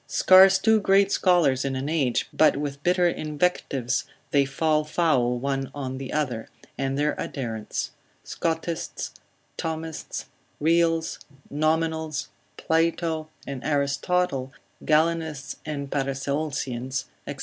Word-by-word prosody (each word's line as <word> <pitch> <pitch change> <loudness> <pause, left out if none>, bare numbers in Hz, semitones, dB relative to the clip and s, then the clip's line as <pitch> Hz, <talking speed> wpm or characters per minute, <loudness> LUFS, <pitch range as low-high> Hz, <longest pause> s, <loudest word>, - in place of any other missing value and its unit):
Scarce 190 +1 +7
two 220 +3 +4
great 200 0 +4
scholars 170 -8 +3
in 135 -1 -2
an 130 +2 -3
age, 145 -6 +1
but 155 -3 +4
with 140 -1 -4
bitter 180 +2 +3
invectives 150 -6 -1 0.3
they 140 -1 +4
fall 155 +2 +1
foul 150 -6 +1
one 135 +1 -2
on 130 -2 -4
the 135 -1 -6
other, 130 -7 -2 0.3
and 135 0 -2
their 150 +1 +1
adherents; 115 -6 -4 0.3
Scotists, 165 0 -3 0.5
Thomists, 160 -1 -4 0.3
Reals, 165 +1 +2 0.3
Nominals, 155 -1 0 0.3
Plato 160 -1 0 0.2
and 135 -3 -6
Aristotle, 140 0 0 0.3
Galenists 155 -3 +1
and 140 -2 -4
Paracelsians, 135 -2 -2 0.2
&c. - - -4
150 Hz, 110 wpm, -25 LUFS, 135-165 Hz, 0.5 s, Scarce